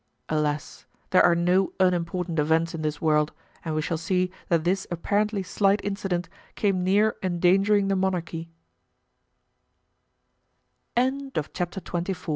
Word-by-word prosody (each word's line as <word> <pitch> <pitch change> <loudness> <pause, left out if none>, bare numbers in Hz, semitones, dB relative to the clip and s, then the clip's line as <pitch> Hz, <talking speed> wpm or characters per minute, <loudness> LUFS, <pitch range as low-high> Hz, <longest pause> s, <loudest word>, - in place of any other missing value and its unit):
Alas! 150 -4 -2 0.2
there 185 - +6
are 170 - +5
no 180 +3 +2
unimportant 175 -2 +1
events 160 +2 +2
in 165 - -4
this 150 -1 -2
world 150 -1 +2 0.3
and 160 -2 -3
we 155 - 0
shall 160 +1 -2
see 180 +1 0 0.2
that 165 -2 +2
this 190 +3 0
apparently 205 +4 0
slight 200 +2 +2
incident 195 -4 -2 0.3
came 195 -3 +1
near 205 +4 +3
endangering 190 +3 +3
the 195 - +1
monarchy. 175 -3 -2 2.5
Chapter 245 - -1
XXV. 180 0 -4
180 Hz, 120 wpm, -26 LUFS, 165-195 Hz, 2.5 s, there